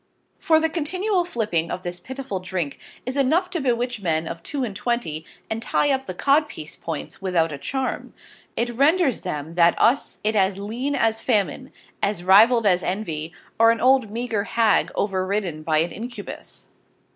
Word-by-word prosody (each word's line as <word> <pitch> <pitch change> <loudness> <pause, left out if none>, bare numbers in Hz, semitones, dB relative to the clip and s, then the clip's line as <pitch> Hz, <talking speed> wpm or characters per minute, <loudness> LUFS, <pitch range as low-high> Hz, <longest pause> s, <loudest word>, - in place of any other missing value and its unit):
For 315 -1 +4
the 320 - +2
continual 355 +4 -1
sipping 205 - -1
of 185 - -4
this 175 0 -5
pittiful 260 -1 -5
drink 180 -6 -3 0.3
is 255 +2 -3
enough 320 +7 +2
to 340 - -2
bewitch 245 -3 -1
Men 160 -3 0
of 165 - -6
two 275 - -3
and 215 -5 -4
twenty, 205 -8 -2 0.2
and 220 0 -3
tie 290 +5 +1
up 265 0 -1
the 185 - -5
Codpice 280 - +1
point 165 +3 -6
without 175 -4 +1
a 140 - -6
Charm. 265 - -3 0.4
It 240 +1 0
renders 285 - +3
them 155 -3 -4
that 170 0 +4
use 265 +4 +2
it 215 +1 +1
as 195 -1 +2
Lean 235 +8 -3
as 225 -2 +1
Famine, 195 -8 0 0.3
as 200 -4 -1
Rivvel'd 220 +5 +6
as 180 -3 +4
Envy, 165 -5 -3 0.3
or 230 0 +7
an 230 0 +2
old 255 -2 +4
meager 220 -2 -2
Hagg 225 -2 +2
over 190 -2 0
ridden 185 -5 -2
by 155 0 +1
an 165 +3 +1
Incubus. 230 -2 -8
215 Hz, 175 wpm, -23 LUFS, 180-260 Hz, 0.4 s, or